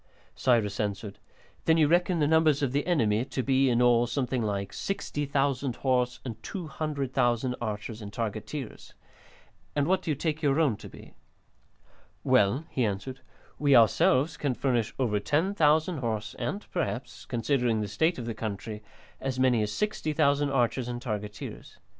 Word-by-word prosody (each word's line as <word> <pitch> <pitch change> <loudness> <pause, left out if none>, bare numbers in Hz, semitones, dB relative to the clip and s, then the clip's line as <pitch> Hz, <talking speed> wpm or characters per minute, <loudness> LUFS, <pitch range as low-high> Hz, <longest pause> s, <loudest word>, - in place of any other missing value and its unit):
Cyrus 110 -5 +1
answered: 100 -1 -3 0.5
"Then 160 0 +4
you 155 -2 +5
reckon 175 +2 +2
the 150 -2 +2
numbers 155 -2 +3
of 135 - +1
the 145 +4 -1
enemy 115 -10 +2
to 130 -1 -3
be, 135 0 +3
in 120 0 +3
all, 120 0 +4
something 125 +1 -1
like 100 -2 -2
60,000 140 -7 -1
horse 125 -1 0
and 115 -3 -6
200,000 135 - -1
archers 110 0 -4
and 100 -1 -7
targeteers. 115 +4 -5 0.8
And 145 -1 +2
what 185 +3 +2
do - - -6
you 150 - +1
take 155 +1 -2
your 145 0 +2
own 145 -9 +3
to - - -10
be?" - - -14 1.1
"Well," 120 +11 +3
he 130 - 0
answered, 110 +5 -3 0.4
"we 145 -2 +4
ourselves 130 +5 +4
can 140 -4 -1
furnish 120 -5 0
over 115 -6 +1
10,000 160 - +2
horse 110 -4 -3
and 205 - -3
perhaps, 135 -7 -3
considering 120 -2 +1
the 105 - -2
state 160 - +1
of 120 - -5
the 115 - -3
country, 105 0 -5 0.4
as 130 -1 -3
many 125 -3 +3
as 105 0 -1
60,000 150 - +1
archers 125 -2 +1
and 120 0 -4
targeteers. 105 -4 -6
130 Hz, 155 wpm, -28 LUFS, 110-145 Hz, 1.1 s, you